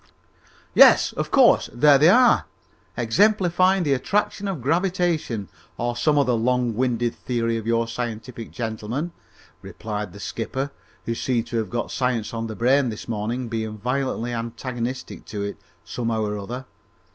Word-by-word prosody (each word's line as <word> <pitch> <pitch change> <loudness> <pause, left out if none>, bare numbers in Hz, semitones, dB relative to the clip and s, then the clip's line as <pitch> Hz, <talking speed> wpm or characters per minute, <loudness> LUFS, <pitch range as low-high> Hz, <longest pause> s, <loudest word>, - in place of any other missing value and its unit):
"Yes, - - +7
of - - -3
course, - - +5
there 140 +3 +5
they 155 +4 +6
are, 245 +5 +5 0.5
exemplifying 185 - +3
the 145 -3 +2
attraction 200 +8 -1
of 190 -6 -3
gravitation 165 - 0 0.3
or 120 0 -2
some 150 +5 +2
other 135 -3 +3
long 120 +1 +1
winded 120 0 0
theory 115 -2 -2
of 115 -1 -4
your 115 0 +1
scientific 115 0 -5
gentlemen," 115 +8 -4 0.5
replied 105 -1 -5
the 100 - -12
skipper, 130 +6 -4 0.3
who 115 - -1
seemed 115 0 -1
to 120 - -4
have 110 -4 -2
got 120 +2 -3
science 125 -5 -1
on 115 0 -3
the 110 - -6
brain 130 +3 +3
this 110 - -7
morning, 115 +3 -3
being 110 -2 -4
violently 125 +1 -2
antagonistic 120 +2 -5
to 105 -2 -5
it, 100 - -5 0.3
somehow 115 +5 -2
or 105 0 -2
other. 120 +6 -6
120 Hz, 150 wpm, -23 LUFS, 115-140 Hz, 0.5 s, Yes